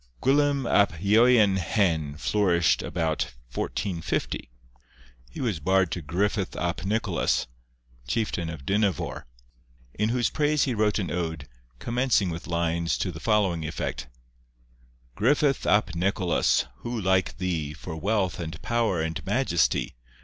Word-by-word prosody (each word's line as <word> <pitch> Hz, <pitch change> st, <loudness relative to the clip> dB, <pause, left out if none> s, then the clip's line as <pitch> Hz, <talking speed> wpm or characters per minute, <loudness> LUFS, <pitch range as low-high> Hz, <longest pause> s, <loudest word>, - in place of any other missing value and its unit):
Gwilym 140 Hz, 0 st, +2 dB
ap 100 Hz, -3 st, +4 dB
Ieuan 105 Hz, 0 st, +5 dB
Hen 85 Hz, -6 st, 0 dB
flourished 85 Hz, -3 st, +2 dB
about 80 Hz, -6 st, -2 dB, 0.2 s
1450. 85 Hz, -7 st, -3 dB, 0.8 s
He -, -, -10 dB
was 110 Hz, -, -1 dB
bard 95 Hz, +3 st, +2 dB
to 90 Hz, -, -3 dB
Griffith 95 Hz, +5 st, -1 dB
ap 85 Hz, +1 st, -2 dB
Nicholas, 105 Hz, -2 st, 0 dB, 0.6 s
chieftain 85 Hz, -, -1 dB
of 80 Hz, -5 st, -8 dB
Dinefor, 100 Hz, -1 st, 0 dB, 0.7 s
in 105 Hz, +2 st, 0 dB
whose 120 Hz, 0 st, +1 dB
praise 150 Hz, -1 st, +2 dB
he 130 Hz, -, 0 dB
wrote 105 Hz, -2 st, +1 dB
an 90 Hz, -7 st, -2 dB
ode, 80 Hz, -5 st, -3 dB, 0.3 s
commencing 120 Hz, -, +1 dB
with 85 Hz, +1 st, -7 dB
lines 85 Hz, 0 st, 0 dB
to 95 Hz, -, -2 dB
the 80 Hz, -, -9 dB
following 100 Hz, -7 st, +1 dB
effect:— 75 Hz, -4 st, -4 dB, 1.1 s
'Griffith 140 Hz, -, +2 dB
ap 105 Hz, -5 st, +3 dB
Nicholas! 90 Hz, 0 st, +1 dB
who 120 Hz, -1 st, -4 dB
like 95 Hz, -1 st, +1 dB
thee 85 Hz, -5 st, -2 dB
For 80 Hz, +2 st, -7 dB
wealth 95 Hz, +1 st, 0 dB
and 80 Hz, -2 st, -5 dB
power 115 Hz, -8 st, +1 dB
and 80 Hz, 0 st, -4 dB
majesty? -, -, +1 dB
95 Hz, 130 wpm, -26 LUFS, 85-110 Hz, 1.1 s, Ieuan